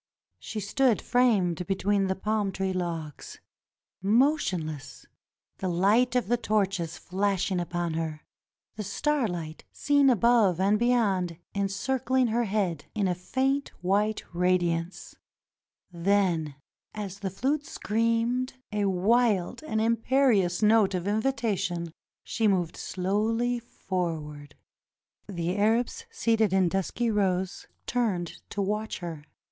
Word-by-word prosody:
She 215 Hz, -, -5 dB
stood 230 Hz, +4 st, +2 dB
framed 195 Hz, -9 st, +2 dB
between 195 Hz, 0 st, +1 dB
the 190 Hz, -, 0 dB
palm 210 Hz, 0 st, -1 dB
tree 190 Hz, 0 st, -2 dB
logs 165 Hz, -5 st, -5 dB, 0.4 s
— -, -, -67 dB, 0.2 s
motionless 160 Hz, -, -2 dB, 0.3 s
— -, -, -58 dB
the 190 Hz, -, -2 dB
light 210 Hz, +8 st, +3 dB
of 250 Hz, -, +1 dB
the 240 Hz, +2 st, +2 dB
torches 195 Hz, -7 st, -1 dB
flashing 190 Hz, -1 st, -1 dB
upon 175 Hz, -1 st, -2 dB
her; 160 Hz, -1 st, -4 dB, 0.5 s
the 215 Hz, -, -3 dB
starlight, 205 Hz, -, -2 dB
seen 285 Hz, -1 st, +3 dB
above 230 Hz, -6 st, +4 dB
and 200 Hz, +2 st, +3 dB
beyond, 200 Hz, -8 st, +1 dB, 0.2 s
encircling 245 Hz, +6 st, 0 dB
her 235 Hz, +2 st, +1 dB
head 190 Hz, -7 st, -1 dB
in 205 Hz, -3 st, +1 dB
a 180 Hz, -, +1 dB
faint 265 Hz, +10 st, -1 dB
white' 205 Hz, +4 st, +1 dB
radiance; 175 Hz, -1 st, 0 dB, 0.8 s
then 170 Hz, -4 st, +1 dB, 0.4 s
as 200 Hz, -2 st, -5 dB
the 195 Hz, -, -3 dB
flute 280 Hz, +10 st, -1 dB
screamed 230 Hz, +3 st, 0 dB, 0.2 s
a 210 Hz, -1 st, 0 dB
wild 205 Hz, +2 st, +2 dB
and 220 Hz, -8 st, -2 dB
imperious 225 Hz, -4 st, +2 dB
note 210 Hz, -3 st, +4 dB
of 180 Hz, +1 st, -3 dB
invitation, 205 Hz, -7 st, -1 dB, 0.3 s
she 225 Hz, -2 st, 0 dB
moved 180 Hz, -5 st, +1 dB
slowly 220 Hz, +6 st, -1 dB
forward. 160 Hz, -9 st, -5 dB, 0.7 s
The 175 Hz, -2 st, -2 dB
Arabs 230 Hz, -, +1 dB
seated 225 Hz, -, +1 dB
in 190 Hz, -2 st, +3 dB
dusky 195 Hz, +6 st, -1 dB
rows 190 Hz, -3 st, -1 dB, 0.2 s
turned 205 Hz, -9 st, -1 dB
to 200 Hz, -, -2 dB
watch 210 Hz, +2 st, -2 dB
her. 165 Hz, -4 st, -7 dB
200 Hz, 120 wpm, -27 LUFS, 180-230 Hz, 0.8 s, above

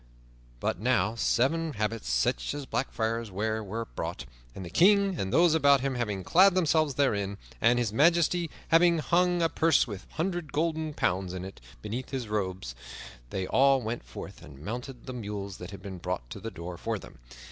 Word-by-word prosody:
But -, -, -1 dB
now 110 Hz, -3 st, +2 dB
seven 145 Hz, +8 st, +1 dB
habits 110 Hz, -, -2 dB
such 60 Hz, -, 0 dB
as 145 Hz, -1 st, -5 dB
Black 135 Hz, -, -2 dB
Friars 115 Hz, 0 st, -2 dB
wear 110 Hz, +3 st, -2 dB
were 110 Hz, +3 st, -4 dB
brought, -, -, -5 dB, 0.3 s
and 95 Hz, -, -6 dB
the 85 Hz, -, -8 dB
King 200 Hz, 0 st, +4 dB
and 95 Hz, 0 st, -2 dB
those 170 Hz, -1 st, +5 dB
about 140 Hz, -4 st, +5 dB
him 135 Hz, 0 st, -1 dB
having 105 Hz, -6 st, -2 dB
clad 185 Hz, -, +5 dB
themselves 155 Hz, -5 st, +2 dB
therein, 100 Hz, -8 st, 0 dB, 0.2 s
and 120 Hz, +1 st, +4 dB
His 115 Hz, -4 st, 0 dB
Majesty 170 Hz, +4 st, +3 dB, 0.2 s
having 170 Hz, +1 st, +5 dB
hung 175 Hz, +2 st, +2 dB
a -, -, +5 dB
purse 165 Hz, -1 st, +3 dB
with 100 Hz, -6 st, -8 dB
a -, -, -22 dB
hundred 175 Hz, -1 st, -2 dB
golden 160 Hz, 0 st, -1 dB
pounds 90 Hz, 0 st, 0 dB
in 90 Hz, 0 st, -5 dB
it 95 Hz, -9 st, -10 dB, 0.2 s
beneath 120 Hz, +5 st, -4 dB
his 130 Hz, -4 st, -4 dB
robes, 95 Hz, -, -3 dB, 0.6 s
they 95 Hz, +4 st, -2 dB
all 135 Hz, +5 st, +4 dB
went 115 Hz, +2 st, -3 dB
forth -, -, -9 dB
and 70 Hz, -, -12 dB
mounted 120 Hz, +3 st, -6 dB
the 130 Hz, -, -6 dB
mules 100 Hz, -4 st, -5 dB
that 90 Hz, -, -8 dB
had 100 Hz, -, -10 dB
been 95 Hz, -3 st, -7 dB
brought 60 Hz, -, -4 dB
to -, -, -6 dB
the -, -, -5 dB
door 85 Hz, +1 st, -7 dB
for -, -, -2 dB
them. -, -, -13 dB
120 Hz, 190 wpm, -28 LUFS, 100-160 Hz, 0.6 s, those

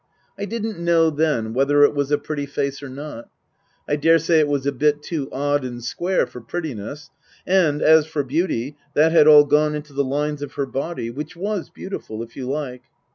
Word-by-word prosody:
I 200 Hz, -, -4 dB
didn't 220 Hz, -2 st, -4 dB
know 170 Hz, -1 st, +3 dB
then 145 Hz, -8 st, 0 dB
whether 140 Hz, +3 st, +4 dB
it 145 Hz, -, +5 dB
was 140 Hz, -1 st, -1 dB
a 145 Hz, -, +3 dB
pretty 145 Hz, 0 st, -4 dB
face 140 Hz, 0 st, -3 dB
or 140 Hz, -, -7 dB
not. 140 Hz, -2 st, -8 dB, 0.6 s
I 145 Hz, -, 0 dB
daresay 165 Hz, +1 st, +4 dB
it 150 Hz, -, +3 dB
was 140 Hz, -2 st, -1 dB
a 140 Hz, -, +2 dB
bit 150 Hz, +2 st, +1 dB
too 145 Hz, -5 st, -4 dB
odd 145 Hz, +1 st, 0 dB
and 120 Hz, -2 st, -6 dB
square 180 Hz, +9 st, 0 dB
for 125 Hz, -, -11 dB
prettiness, 145 Hz, 0 st, -6 dB, 0.3 s
and, 175 Hz, -6 st, +2 dB
as 160 Hz, -1 st, +6 dB
for 155 Hz, -2 st, -2 dB
beauty, 145 Hz, -2 st, -2 dB, 0.2 s
that 155 Hz, +2 st, +4 dB
had 160 Hz, -2 st, +6 dB
all 150 Hz, -1 st, +9 dB
gone 150 Hz, +1 st, +2 dB
into 150 Hz, -1 st, -7 dB
the 140 Hz, +1 st, +1 dB
lines 145 Hz, +2 st, -2 dB
of 145 Hz, -1 st, -6 dB
her 140 Hz, -, -2 dB
body 135 Hz, -3 st, -4 dB
(which 150 Hz, +6 st, -7 dB
was 200 Hz, +1 st, -3 dB
beautiful, 115 Hz, -, -7 dB
if 115 Hz, -, -13 dB
you 130 Hz, -2 st, -5 dB
like). 135 Hz, -3 st, -4 dB
145 Hz, 200 wpm, -22 LUFS, 140-160 Hz, 0.6 s, all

